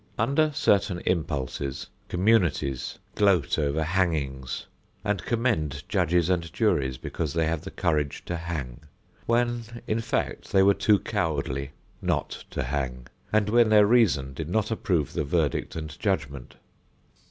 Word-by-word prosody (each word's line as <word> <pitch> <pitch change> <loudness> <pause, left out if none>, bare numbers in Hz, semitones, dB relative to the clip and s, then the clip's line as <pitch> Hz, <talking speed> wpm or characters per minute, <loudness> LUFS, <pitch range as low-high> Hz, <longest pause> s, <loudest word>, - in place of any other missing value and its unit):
Under 140 +7 +2
certain 100 - +2
impulses, 70 -6 -2 0.2
communities 90 - +1 0.2
gloat 95 -9 +2
over 75 +1 +1
hangings 75 -7 -1 0.4
and 105 -1 0
commend 90 - 0
judges 85 0 +2
and 85 -3 0
juries 65 -2 +1
because 75 +2 -4
they 80 -1 +2
have 80 -1 -1
the 95 - -7
courage 75 -8 -1
to 90 - -3
hang, 80 -8 -5 0.5
when, 120 -1 0
in 110 - 0
fact, - - -2
they 95 -1 +6
were 100 +1 +6
too 105 +1 +3
cowardly 75 - -2 0.3
not - - -2
to - - -3
hang 65 -2 -3 0.3
and 105 -1 +3
when 115 +1 +4
their 105 -1 +7
reason 100 - +3
did 80 +3 -5
not 110 +4 0
approve 90 -9 0
the - - 0
verdict 75 0 0
and 80 -2 -6
judgment. 70 -3 -2
85 Hz, 140 wpm, -26 LUFS, 70-105 Hz, 0.5 s, their